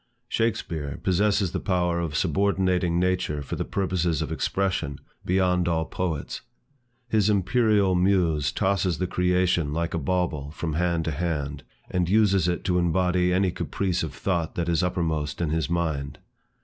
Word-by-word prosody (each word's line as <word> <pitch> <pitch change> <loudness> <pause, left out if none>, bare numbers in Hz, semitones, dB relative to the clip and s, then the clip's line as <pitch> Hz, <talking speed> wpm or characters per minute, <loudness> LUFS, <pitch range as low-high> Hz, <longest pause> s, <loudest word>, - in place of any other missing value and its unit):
Shakspeare 80 -10 -2
possesses 100 0 +2
the - - -2
power 90 -2 0
of 80 -3 -3
subordinating 90 0 +1
nature 90 -5 0
for - - -4
the - - -2
purposes 90 -5 -1
of - - -6
expression, 95 -8 -1 0.3
beyond 90 -1 +2
all 80 -1 +1
poets. 80 -4 -3 0.7
His 110 -3 +2
imperial 105 -1 +3
muse 90 -6 +2
tosses 95 -3 0
the 90 - -1
creation 90 -4 +1
like 85 +1 -2
a 85 - 0
bauble 80 -3 -1
from 80 +1 -4
hand 85 0 0
to 80 - -1
hand, 75 -3 -2 0.3
and 90 -1 -1
uses 100 -4 +3
it 90 0 -1
to 90 -1 +1
embody 90 +1 +2
any 95 0 +2
caprice 95 0 -2
of 75 -5 -4
thought 85 +2 -1
that 85 -1 -1
is 85 -2 +2
upper 90 -1 0
most 75 -3 -2
in 85 -3 0
his 80 -3 -1
mind. 80 -5 -2
90 Hz, 160 wpm, -25 LUFS, 80-95 Hz, 0.7 s, imperial